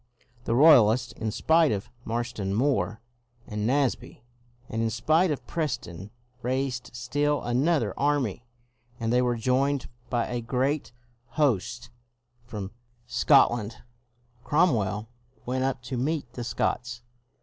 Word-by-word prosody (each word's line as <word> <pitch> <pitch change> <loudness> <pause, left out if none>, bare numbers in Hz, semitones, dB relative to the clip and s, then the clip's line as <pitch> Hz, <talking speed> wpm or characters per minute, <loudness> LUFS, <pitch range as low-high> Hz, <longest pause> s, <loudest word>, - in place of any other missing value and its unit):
The 115 - +1
Roy 155 +5 +9
alists, 115 +2 +2
in 110 - -3
spite 160 +7 +3
of 100 +2 -3
Marston 115 -4 -2
Moor 110 -5 0 0.4
and 105 0 -3
Naseby, 135 -1 -1 0.4
and 115 - -3
in 115 - +1
spite 155 - +2
of 150 - -3
Preston, 120 - -4 0.3
raised 130 0 -2
still 145 +5 0
another 125 - +1
army, 140 -7 0 0.6
and 115 +1 -1
they 125 - +4
were 125 -1 +1
joined 130 +3 0 0.2
by 120 -2 0
a 120 -1 -3
great 130 +5 -1 0.5
host 120 -4 0 0.5
from 105 -5 -6 0.3
Scotland. 115 -2 +3 0.6
Cromwell 110 - +1 0.4
went 130 +1 -1
up 135 -2 -2
to 130 0 -4
meet 135 -1 -2
the 120 - -5
Scots. 120 0 -2
120 Hz, 125 wpm, -27 LUFS, 115-140 Hz, 0.6 s, Roy